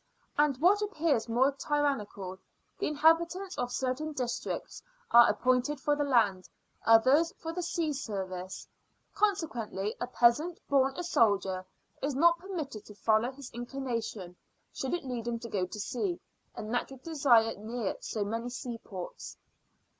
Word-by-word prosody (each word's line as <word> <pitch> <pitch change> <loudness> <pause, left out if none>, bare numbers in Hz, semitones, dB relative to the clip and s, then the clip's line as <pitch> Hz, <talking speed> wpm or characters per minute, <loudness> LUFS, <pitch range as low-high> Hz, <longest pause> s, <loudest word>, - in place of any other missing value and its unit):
And, 295 -3 +3
what 370 +8 +4
appears 315 - 0
more 255 +4 +3
tyrannical, 270 -10 -2 0.4
the - - 0
inhabitants 335 +5 +2
of 245 0 -1
certain 265 +5 -2
districts 250 -4 -4 0.3
are 235 0 +8
appointed 255 +3 +1
for 295 +2 +1
the 290 - 0
land, 220 -9 +2 0.4
others 260 +9 +6
for 325 0 -5
the 360 - -2
sea 335 -3 -1
service. 190 -7 -5 0.5
Consequently, 250 - -1
a 245 - -1
peasant, 255 +8 +3
born 270 -1 +2
a 355 - -2
soldier, 200 - +2 0.4
is 280 0 -1
not 335 +4 +5
permitted 325 - -5
to 210 - -12
follow 220 +4 +2
his 270 -1 -10
inclination 235 -7 -4 0.4
should 265 +5 -2
it 345 - -6
lead 240 -3 -4
him 235 -1 -1
to 230 0 -8
go 190 -3 -1
to 210 - -8
sea, 340 - -2 0.4
a - - -5
natural 245 +4 -3
desire 265 -8 +3
near 220 -1 -3
so 215 - -3
many 230 +3 -3
seaports. 230 -7 -7
255 Hz, 145 wpm, -30 LUFS, 225-300 Hz, 0.5 s, are